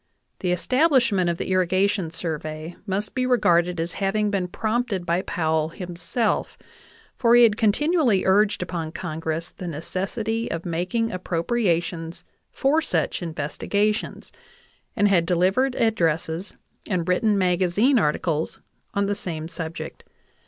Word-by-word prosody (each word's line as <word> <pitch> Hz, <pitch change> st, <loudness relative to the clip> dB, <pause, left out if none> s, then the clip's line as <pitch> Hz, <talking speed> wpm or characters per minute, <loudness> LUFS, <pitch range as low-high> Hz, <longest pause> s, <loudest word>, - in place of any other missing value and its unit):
The 180 Hz, -, -1 dB
establishment 235 Hz, -, +2 dB
of 170 Hz, -, -1 dB
the -, -, -3 dB
Irrigation 185 Hz, 0 st, +2 dB
Survey 155 Hz, 0 st, -5 dB
must 200 Hz, +2 st, -2 dB
be 255 Hz, -1 st, 0 dB
re 250 Hz, -1 st, +4 dB
garded 175 Hz, -3 st, +2 dB
as 165 Hz, +1 st, -2 dB
having 205 Hz, +2 st, +1 dB
been 190 Hz, -3 st, 0 dB
prompted 215 Hz, -1 st, -1 dB
by 170 Hz, +2 st, +1 dB
Powell 160 Hz, -3 st, 0 dB
himself, 180 Hz, +6 st, -2 dB, 0.6 s
for 235 Hz, -2 st, +4 dB
he 240 Hz, -, +8 dB
had 220 Hz, -3 st, +5 dB
continually 235 Hz, -, +2 dB
urged 200 Hz, 0 st, +3 dB
upon 165 Hz, -3 st, -4 dB
Congress 165 Hz, -1 st, -4 dB
the 180 Hz, -, -8 dB
necessity 195 Hz, +8 st, -3 dB
of 165 Hz, 0 st, -4 dB
making 180 Hz, +7 st, -1 dB
ap 185 Hz, -2 st, -6 dB
propriations 170 Hz, -3 st, -1 dB, 0.3 s
for 300 Hz, +4 st, +2 dB
such 320 Hz, -, -1 dB
investigations, 180 Hz, +7 st, -2 dB, 0.6 s
and 205 Hz, -, +3 dB
had 185 Hz, -4 st, +4 dB
delivered 190 Hz, +10 st, +2 dB
ad 225 Hz, -1 st, +2 dB
dresses 165 Hz, 0 st, -1 dB, 0.3 s
and 180 Hz, -4 st, -1 dB
written 205 Hz, +3 st, +2 dB
magazine 185 Hz, +7 st, +3 dB
articles 155 Hz, -1 st, -1 dB, 0.4 s
on 200 Hz, 0 st, +2 dB
the 200 Hz, -, 0 dB
same 165 Hz, -5 st, -5 dB
subject. 165 Hz, -1 st, -6 dB
185 Hz, 135 wpm, -24 LUFS, 170-215 Hz, 0.6 s, he